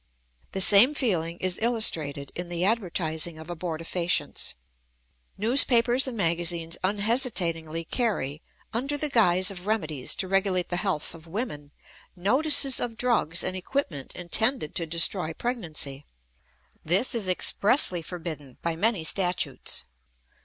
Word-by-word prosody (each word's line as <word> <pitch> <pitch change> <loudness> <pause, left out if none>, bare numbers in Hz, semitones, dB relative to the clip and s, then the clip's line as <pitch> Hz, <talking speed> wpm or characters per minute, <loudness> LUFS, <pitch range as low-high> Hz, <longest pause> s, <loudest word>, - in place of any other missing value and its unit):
The 190 - -1
same 220 +8 +7
feeling 170 - -1
is 185 -1 -1
illustrated 160 - +1
in 175 0 -6
the 175 +1 -1
advertising 175 -6 -2
of 160 +1 -11
abortifacients. 170 +1 -2 0.8
Newspapers 240 +2 +4
and 245 -3 -5
magazines 170 -2 -1
unhesitatingly 185 - -1
carry, 160 - -2 0.3
under 275 +6 -2
the 300 +1 -1
guise 185 -5 +3
of 185 0 -10
remedies 155 - -2
to 190 - -3
regulate 190 -1 0
the 175 - -2
health 175 -5 -2
of 165 0 -14
women, 165 - -5 0.5
notices 270 - +4
of 230 -2 -4
drugs 195 -10 0
and 185 - -2
equipment 185 - -4
intended 220 - 0
to 165 - -3
destroy 170 +1 +1
pregnancy. 160 - -5 0.8
This 190 +11 +2
is 215 -6 0
expressly 185 - +5
forbidden 160 -6 -8
by 170 -1 -1
many 200 0 0
statutes. 180 +1 0
180 Hz, 125 wpm, -26 LUFS, 165-225 Hz, 0.8 s, same